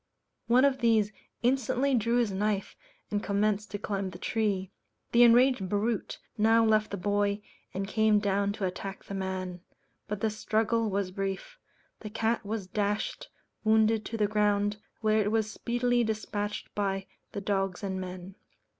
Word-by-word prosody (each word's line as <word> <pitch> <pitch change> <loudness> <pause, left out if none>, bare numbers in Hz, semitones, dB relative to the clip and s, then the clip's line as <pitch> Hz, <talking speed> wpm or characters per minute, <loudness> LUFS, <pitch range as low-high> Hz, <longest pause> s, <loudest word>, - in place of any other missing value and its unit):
One 250 +3 +5
of 270 -1 +2
these 220 -3 +3 0.3
instantly 265 +2 +2
drew 230 -1 +2
his 240 -4 +2
knife 200 +1 -1 0.4
and 205 0 0
commenced 210 0 0
to 205 - -4
climb 195 -1 -2
the 180 - -9
tree. 195 -2 -1 0.4
The 235 - +5
enraged 240 -4 +5
brute 210 +2 -1 0.2
now 225 +1 +5
left 215 -1 +3
the 200 - -4
boy 205 +2 0 0.3
and 195 +1 -3
came 220 0 +3
down 200 0 +1
to 205 - -3
attack 190 +1 -5
the - - -8
man; 185 -2 -4 0.5
but 210 -1 -3
the 220 - +1
struggle 220 +1 0
was 195 -1 -1
brief; 195 - -4 0.4
the 215 - -7
cat 225 +2 0
was 210 -1 -3
dashed, 205 +2 -2 0.3
wounded, 220 0 +3
to 225 - -4
the 210 - +3
ground, 205 0 +1 0.2
where 215 0 +3
it 205 0 +1
was 220 -1 +1
speedily 240 +1 +1
despatched 210 -1 -3
by 195 -1 -1 0.3
the 200 - -3
dogs 195 -1 -1
and 190 -1 -2
men. 185 +1 -7
210 Hz, 160 wpm, -29 LUFS, 195-225 Hz, 0.5 s, One